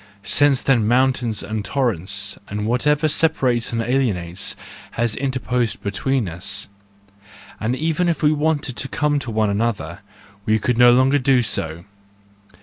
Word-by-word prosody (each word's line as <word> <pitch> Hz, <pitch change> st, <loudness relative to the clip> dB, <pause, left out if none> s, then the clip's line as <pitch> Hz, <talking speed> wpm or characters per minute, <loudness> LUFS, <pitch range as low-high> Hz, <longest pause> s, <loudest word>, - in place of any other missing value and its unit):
Since 140 Hz, +4 st, +2 dB
then 120 Hz, -6 st, +2 dB
mountains 125 Hz, -3 st, +1 dB
and 110 Hz, -1 st, -4 dB
torrents, 100 Hz, -, -1 dB
and 105 Hz, +1 st, -4 dB
whatever 150 Hz, +6 st, +2 dB
separates 135 Hz, -7 st, +1 dB
and 115 Hz, -1 st, -1 dB
alienates, 100 Hz, -9 st, -1 dB, 0.4 s
have 115 Hz, -1 st, 0 dB
interposed 125 Hz, -3 st, -2 dB
between 120 Hz, +3 st, -1 dB
us, 95 Hz, +4 st, -3 dB, 0.9 s
and 115 Hz, +3 st, -1 dB
even 165 Hz, +4 st, 0 dB
if 165 Hz, -3 st, -2 dB
we 150 Hz, -, +5 dB
wanted 150 Hz, -3 st, -1 dB
to 135 Hz, -, -1 dB
come 150 Hz, -1 st, 0 dB
to 130 Hz, -, -5 dB
one 110 Hz, -2 st, 0 dB
another, 110 Hz, +1 st, -2 dB, 0.4 s
we 110 Hz, +2 st, +2 dB
could 120 Hz, +3 st, -1 dB
no 120 Hz, 0 st, +8 dB
longer 130 Hz, +3 st, +4 dB
do 130 Hz, -1 st, +3 dB
so 80 Hz, -5 st, -3 dB
120 Hz, 145 wpm, -20 LUFS, 105-135 Hz, 0.9 s, no